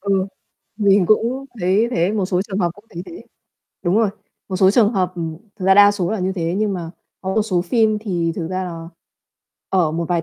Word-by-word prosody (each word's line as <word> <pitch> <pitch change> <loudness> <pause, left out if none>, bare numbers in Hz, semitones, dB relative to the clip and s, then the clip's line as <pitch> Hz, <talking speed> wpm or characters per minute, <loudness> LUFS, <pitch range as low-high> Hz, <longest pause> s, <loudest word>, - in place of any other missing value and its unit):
Ừ. 195 -1 0 0.5
Mình 200 -3 +4
cũng 235 +6 +1 0.2
thấy 185 +2 +2
như 225 +3 +3
thế, 180 -4 +1
một 210 -3 0
số 185 0 0
trường 200 -1 -5
hợp 175 -3 +1
cũng 205 - -18
thấy 170 - -6
thế. 345 - -10 0.6
Đúng 180 +2 +1
rồi. 225 -2 +3 0.4
Một 190 - -2
số 190 0 +5
trường 215 +1 +4
hợp 185 -3 0
ừm, 165 -2 -4 0.2
thực 185 - -6
ra 190 - +6
đa 205 0 +8
số 195 -3 -2
là 220 - -1
như 185 0 -1
thế, 170 -2 -2
nhưng 210 -1 0
mà 170 -3 -5 0.3
có 190 0 -3
một 220 - +3
số 185 -5 0
phim 215 +3 +2
thì 175 -6 -1
thực 165 -2 -3
ra 185 +1 -2
là 165 -2 -7 0.8
ở 175 -5 +2
một 170 +1 -2
vài 175 -2 +1
190 Hz, 235 wpm, -20 LUFS, 175-210 Hz, 0.8 s, đa